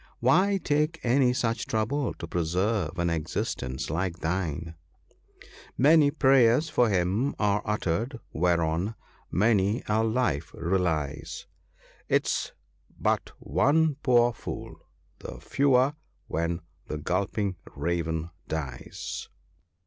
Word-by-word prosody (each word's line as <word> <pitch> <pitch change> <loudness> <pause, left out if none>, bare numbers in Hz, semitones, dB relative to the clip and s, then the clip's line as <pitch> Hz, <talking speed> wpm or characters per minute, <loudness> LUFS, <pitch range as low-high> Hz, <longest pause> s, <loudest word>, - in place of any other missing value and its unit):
Why 185 +11 +4
take 155 -1 0
any 125 +1 +4
such 115 -4 -1
trouble 120 +6 -1
to - - -6
preserve 90 +1 0
an 85 -1 +1
existence 75 -5 -3
like 85 +1 -1
thine? 80 -2 -2 0.4
— - - -23
" - - -22 0.2
Many 150 +2 +6
prayers 135 +1 +4
for 120 -2 +3
him 95 +8 +1
are 105 -1 +2
uttered 105 - -1
whereon 85 +4 +1 0.3
many 105 +2 +2
a 110 +1 +2
life 110 - 0
relies; 85 -5 -1 0.6
'Tis - - +1 0.5
but - - +1
one 145 - +2
poor 120 -2 +4
fool - - -7 0.5
the - - -8
fewer 135 0 +3 0.3
when 85 +1 -2 0.3
the 75 - -3
gulping 95 +4 -1 0.2
Raven 85 -1 -2 0.2
dies. 70 -6 -5
100 Hz, 110 wpm, -27 LUFS, 85-125 Hz, 0.6 s, Many